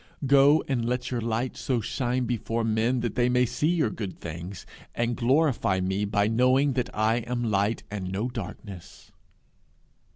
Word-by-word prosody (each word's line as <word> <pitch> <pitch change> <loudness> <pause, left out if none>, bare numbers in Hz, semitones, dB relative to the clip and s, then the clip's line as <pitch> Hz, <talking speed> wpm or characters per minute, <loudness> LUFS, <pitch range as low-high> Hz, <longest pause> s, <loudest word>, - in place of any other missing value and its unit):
Go, 140 +3 +5
and 130 -4 0
let 125 +2 -2
your 120 -2 -1
light 115 +3 -2
so 125 -3 -1
shine 125 +2 -1
before 115 -1 -2
men 115 +3 +1
that 120 - -2
they 125 0 +2
may 125 0 +3
see 145 +5 -1
your 165 -10 +1
good 100 -4 -6
things, 85 +3 -7 0.3
and 120 0 0
glorify 130 -6 +2
me 95 +2 -1
by 100 0 +1
knowing 130 +5 +3
that 125 -1 -1
I 110 +2 +1
am 120 +1 -3
light 100 +3 0
and 95 -3 -4
no 100 +5 -1
darkness'! 100 -5 -9
120 Hz, 165 wpm, -26 LUFS, 105-125 Hz, 0.3 s, Go